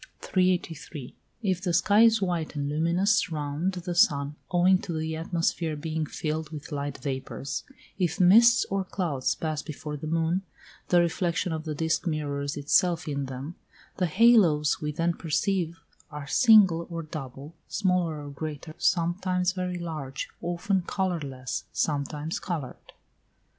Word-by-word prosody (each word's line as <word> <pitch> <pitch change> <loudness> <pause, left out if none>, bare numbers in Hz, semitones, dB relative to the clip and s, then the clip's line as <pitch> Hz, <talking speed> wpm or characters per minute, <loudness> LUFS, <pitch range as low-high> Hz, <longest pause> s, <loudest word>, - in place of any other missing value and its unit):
383. 170 -7 -1 0.3
If 185 -3 0
the 180 -2 -1
sky 205 +5 +4
is 225 -2 +5
white 170 -4 -2
and 140 -1 -2
luminous 170 +7 +2
round 150 +4 -2
the 180 -1 -4
sun 145 -6 +3 0.2
owing 180 +1 +4
to 175 - -5
the 160 0 -2
atmosphere 165 -1 -1
being 155 0 -3
filled 155 0 -3
with 150 0 -8
light 145 -1 -3
vapours; 135 +1 -4 0.4
if 175 -2 0
mists 230 +6 +6
or 195 0 0
clouds 170 -8 -1
pass 155 -2 -3
before 150 0 -6
the 150 +2 -6
moon, 165 +3 +1 0.5
the 175 - +4
reflection 175 +1 0
of 160 0 -4
the 155 -1 -3
disk 160 +3 0
mirrors 145 -2 -2
itself 160 +3 +2
in 140 -2 -2
them; 135 +5 -6 0.4
the 180 - +1
halos 175 -7 +4
we 150 -1 -2
then 165 +3 0
perceive 170 0 -1 0.3
are 150 -2 -7
single 190 - +5
or 165 -1 -4
double, 145 -1 -8
smaller 175 -6 0
or 145 - -7
greater, 155 +1 -6
sometimes 180 +1 +1
very 180 -1 -3
large, 155 -6 -5
often 175 +3 0
colourless, 160 -9 -3
sometimes 150 +1 -2
coloured. 155 -8 -6
165 Hz, 140 wpm, -27 LUFS, 150-180 Hz, 0.5 s, mists